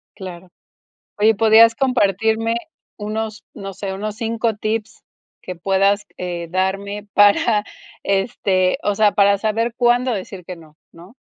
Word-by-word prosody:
Claro. 185 -2 -10 0.7
Oye, 220 +1 +4
¿podrías 225 +2 +6
compartirme 225 -2 +1 0.4
unos, 215 +1 -4
no 195 -2 -7
sé, 195 -2 -5
unos 210 +2 -5
5 225 -1 -1
tips 215 +1 -4 0.4
que 185 - -6
puedas, 195 +3 +1
eh, 175 -2 -5
darme 195 +3 -2
para 205 +1 +4 0.4
este, 195 -2 0
o 205 - 0
sea, 210 0 +3
para 200 0 +3
saber 225 +3 -1
cuándo 245 0 +2
decir 190 -2 -7
que 180 -1 -8
no? 155 -2 -18 0.2
¿no? 175 +7 -15
205 Hz, 135 wpm, -20 LUFS, 190-220 Hz, 0.7 s, podrías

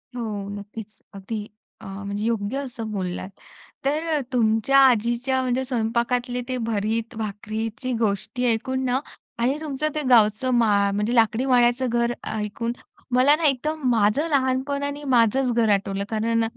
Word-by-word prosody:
हो, 210 -4 -4
नक्कीच. 205 +1 -7 0.3
अगदी 205 +2 -6 0.3
अ, - - -11
म्हणजे 200 +1 -5
योग्य 225 +2 -1
असं 245 -5 -5
बोललात. 185 -2 -4 0.6
तर 300 +3 +1
अ, - - 0
तुमच्या 225 +3 +3
आजीच्या 250 +1 +3
म्हणजे 255 0 0
स्वयंपाकातले 245 +1 -1
ते 255 - -1
भरीत 225 +2 -1
भाकरीची 220 +3 -4
गोष्टी 220 +3 -1
ऐकून 260 +4 -2
ना 255 +1 +1 0.4
आणि 270 +4 +1
तुमचं 305 0 -2
ते 305 - 0
गावचं 225 +2 +4
माळ 205 -3 +3
म्हणजे 210 +4 0
लाकडी 230 +2 +3
माळ्याचं 245 0 +3
घर 235 0 +1 0.2
ऐकून, 220 +2 -3 0.4
मला 275 +4 +6
ना, 330 - -5
एकदम 300 +3 0
माझं 230 +6 +2
लहानपण 275 0 0
आणि 285 +1 -4
माझंच 255 -1 +3
घर 230 -2 +2
आठवलं. 195 0 -1
कारण 225 +1 +1
235 Hz, 145 wpm, -24 LUFS, 215-260 Hz, 0.6 s, मला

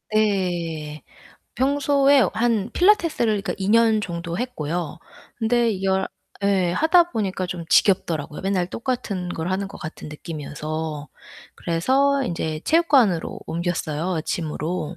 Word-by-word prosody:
예. 175 -7 0 0.5
평소에 280 +1 +3
한 225 -2 0
필라테스를 325 - +3
그러니까 - - -3
2 190 0 -2
년 225 0 +4
정도 170 -2 -4
했고요. 170 - -3 0.4
근데 235 0 +2
이걸 190 -1 0 0.4
예 190 -3 +2
하다 340 - +4
보니까 190 - -2
좀 175 -1 -5
지겹더라고요 160 -6 +2
맨날 190 -2 0
똑같은 200 -5 -3
걸 165 0 -3
하는 195 +1 -2
것 200 - -11
같은 155 0 -8
느낌이어서. 150 0 -5 0.5
그래서 270 +12 +1
인제 160 -5 -3
체육관으로 270 - +3
옮겼어요 170 0 -2
gym으로. 160 +1 -3
190 Hz, 290 characters per minute, -23 LUFS, 165-235 Hz, 0.5 s, 년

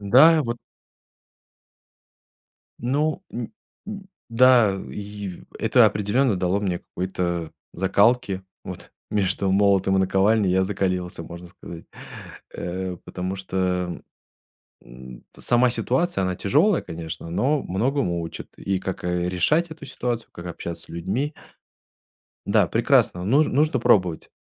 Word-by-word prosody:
Да 145 +10 +6
вот 120 0 -3 2.2
Ну, 150 - 0
н 120 -1 -5 0.4
н 200 -2 -7 0.2
да, 115 -4 +5
и 100 -3 -7 0.2
это - - +5
определенно 105 +3 +1
дало 90 +2 0
мне 90 -4 -1
какой-то 85 -3 -3 0.2
закалки. 100 +1 +2 0.2
Вот. - - -9 0.2
Между 95 -1 0
молотом 95 -1 +3
и - - +3
наковальней 95 +2 +3
я 95 +1 +3
закалился, 90 -3 -2
можно 85 +1 -9
сказать. 85 -1 -11 0.7
Э, 90 +1 -4
потому 95 +1 -4
что, 95 0 -6 0.3
эм, 90 - -7 0.8
м, 60 0 -12
сама 125 0 +3
ситуация, 130 - 0
она 95 -1 -1
тяжелая, 160 - +2
конечно, 80 0 -7
но 140 - +1
многому 95 -4 0
учит. 80 - -7
И 95 -1 -1
как, 95 0 -5
э, 90 0 0
решать 150 - +1
эту 160 - -9
ситуацию, 120 -2 -3
как 85 - -9
общаться 85 0 -6
с - - -23
людьми. 100 - -2 1.1
Да, - - +4
прекрасно, 90 0 +2
нуж 140 +10 +4
нужно 150 +4 +2
пробовать. 90 -9 +2
95 Hz, 125 wpm, -24 LUFS, 90-125 Hz, 2.2 s, Да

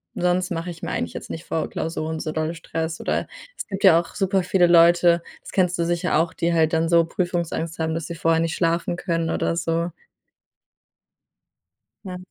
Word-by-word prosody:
sonst 180 +1 +1
mache 175 0 -3
ich 165 - -12
mir - - -4
eigentlich 85 - -3
jetzt - - -8
nicht 165 - -6
vor 160 - -2
Klausuren 160 0 -3
so 155 - -3
dolle 160 +1 -2
Stress 160 -1 -4
oder - - -1 0.3
es - - -6
gibt 195 -1 -5
ja 185 -4 +8
auch 170 - -14
super 195 0 +1
viele 180 0 +3
Leute, 170 0 +5 0.2
das - - -11
kennst 180 -2 +1
du 170 - 0
sicher 175 -1 0
auch, 165 +1 +1
die 170 0 0
halt 160 -1 +2
dann 165 0 +1
so 170 -1 +5
Prüfungsangst 170 -2 -2
haben, 160 0 -1
dass 165 -2 -4
sie 170 - -6
vorher 165 0 +2
nicht 165 0 -1
schlafen 170 0 0
können 165 -3 -1
oder 165 - 0
so. 170 0 -1 2.1
Ja. 180 -2 -6
170 Hz, 195 wpm, -23 LUFS, 165-175 Hz, 2.1 s, ja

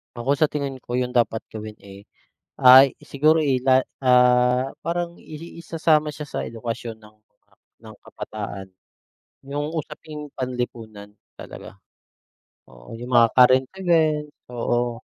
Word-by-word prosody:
Ako 130 +4 -1
sa 155 - +4
tingin 140 -2 -4
ko, 120 -1 -9
yung 125 0 0
dapat 115 -2 +1
gawin, 110 0 -8
eh, 100 0 -14 0.5
ay 130 +1 +7
siguro, 155 +3 +2
eh, 135 -5 +1
la 130 0 +4 0.2
ah, 125 0 +3
parang 170 0 -3
i 155 - -12
i 165 +2 -10
isasama 160 -2 +1
siya 150 0 -8
sa - - -4
edukasyon 115 0 -6
ng 110 0 -19 0.7
ng - - -11
kabataan, 100 -2 -7 0.8
yung 145 +2 -3
usaping 150 -1 -7
panlipunan 115 -5 -5 0.2
talaga, - - -12 0.9
oo, - - -16
yung 120 +1 -8
mga 115 -1 +7
current 130 +1 +6
event, 160 -4 +2 0.2
oo. 120 0 -1
125 Hz, 130 wpm, -23 LUFS, 120-150 Hz, 0.9 s, ay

